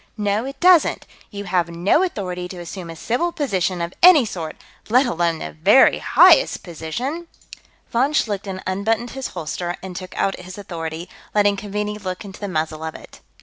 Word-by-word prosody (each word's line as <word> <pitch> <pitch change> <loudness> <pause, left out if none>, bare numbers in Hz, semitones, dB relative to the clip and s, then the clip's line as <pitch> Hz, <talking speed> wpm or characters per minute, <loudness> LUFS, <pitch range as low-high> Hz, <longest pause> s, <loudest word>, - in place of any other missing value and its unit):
"No, 210 +2 0
it 275 0 -7
doesn't. 360 -1 +4 0.2
You 200 -1 -7
have 180 -3 0
no 175 - +2
authority 180 - -3
to 180 - -9
assume 175 0 -7
a 165 - -7
civil 245 - -1
position 190 - -1
of 170 - -5
any 340 -8 +8
sort, 165 -7 -5 0.3
let 250 +5 +4
alone 170 -6 0
the 80 - -6
very 75 0 +5
highest - - +5
position...." 245 - -5 0.6
Von 255 +5 +2
Schlichten 200 -7 -2
unbuttoned 220 +5 -1
his 270 -1 -4
holster 175 +2 -3
and 185 -1 -7
took 185 0 -8
out 195 - 0
his 180 +1 -10
authority, 165 -3 -6 0.3
letting 205 -1 +4
Keaveney 210 +1 -4
look 185 0 -5
into 195 0 -10
the 205 - -4
muzzle 155 -3 -3
of 160 -1 -5
it. - - -13
195 Hz, 175 wpm, -21 LUFS, 175-225 Hz, 0.6 s, any